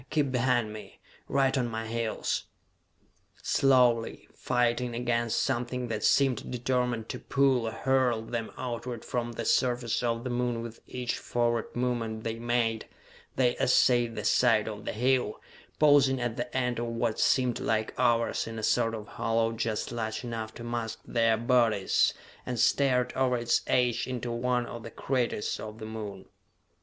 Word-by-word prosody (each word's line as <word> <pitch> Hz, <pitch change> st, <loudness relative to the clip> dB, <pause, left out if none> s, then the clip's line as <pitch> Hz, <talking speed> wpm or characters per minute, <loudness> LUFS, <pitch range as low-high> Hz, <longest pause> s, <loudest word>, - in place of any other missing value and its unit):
Keep 145 Hz, -4 st, +1 dB
behind 120 Hz, -3 st, +1 dB
me, 105 Hz, -2 st, -11 dB, 0.3 s
right 135 Hz, -1 st, +2 dB
on 125 Hz, -3 st, +1 dB
my 115 Hz, -1 st, -4 dB
heels!" 115 Hz, 0 st, -2 dB, 1.0 s
Slowly, 125 Hz, -4 st, +3 dB
fighting 120 Hz, 0 st, 0 dB
against 120 Hz, -1 st, 0 dB
something 125 Hz, -1 st, -2 dB
that 110 Hz, -2 st, -3 dB
seemed 135 Hz, -4 st, +2 dB
determined 125 Hz, -2 st, -1 dB
to -, -, -4 dB
pull, 135 Hz, -4 st, +2 dB
or -, -, -2 dB
hurl, 125 Hz, -2 st, +1 dB
them 115 Hz, 0 st, -4 dB
outward 120 Hz, -1 st, -5 dB
from 120 Hz, -1 st, -2 dB
the -, -, -4 dB
surface 120 Hz, -2 st, +1 dB
of 115 Hz, -1 st, -1 dB
the 130 Hz, -, -3 dB
Moon 120 Hz, -1 st, -1 dB
with 115 Hz, -1 st, -8 dB
each 125 Hz, -1 st, -3 dB
forward 120 Hz, -1 st, -1 dB
movement 120 Hz, -3 st, -2 dB
they 115 Hz, 0 st, -3 dB
made, 115 Hz, -2 st, 0 dB, 0.5 s
they 125 Hz, -2 st, +2 dB
essayed 120 Hz, -2 st, +3 dB
the -, -, -4 dB
side 115 Hz, -4 st, +3 dB
of 105 Hz, -1 st, -6 dB
the -, -, -2 dB
hill, 125 Hz, -1 st, +1 dB, 0.4 s
pausing 145 Hz, -3 st, +5 dB
at 120 Hz, -2 st, -2 dB
the 120 Hz, +1 st, -4 dB
end 125 Hz, -2 st, 0 dB
of 120 Hz, -, -2 dB
what 115 Hz, -1 st, -1 dB
seemed 125 Hz, -3 st, +2 dB
like 110 Hz, -1 st, -1 dB
hours 120 Hz, -3 st, +2 dB
in 115 Hz, 0 st, -6 dB
a 110 Hz, -, -5 dB
sort 115 Hz, 0 st, +2 dB
of 105 Hz, 0 st, -8 dB
hollow 115 Hz, -1 st, 0 dB
just 115 Hz, -1 st, -2 dB
large 110 Hz, -1 st, -3 dB
enough 115 Hz, -2 st, -4 dB
to 120 Hz, -, -8 dB
mask 120 Hz, -1 st, -3 dB
their 115 Hz, -1 st, +2 dB
bodies 115 Hz, -4 st, +2 dB, 0.3 s
and 125 Hz, -2 st, -4 dB
stared 125 Hz, 0 st, +2 dB
over 130 Hz, -1 st, +1 dB
its 120 Hz, 0 st, +1 dB
edge 125 Hz, -2 st, +1 dB
into 125 Hz, -2 st, -3 dB
one 125 Hz, +1 st, 0 dB
of 120 Hz, 0 st, -7 dB
the 115 Hz, -, -8 dB
craters 125 Hz, -4 st, -1 dB
of 110 Hz, 0 st, -7 dB
the 110 Hz, -, -7 dB
Moon. 105 Hz, -3 st, -7 dB
120 Hz, 165 wpm, -29 LUFS, 115-125 Hz, 1.0 s, pausing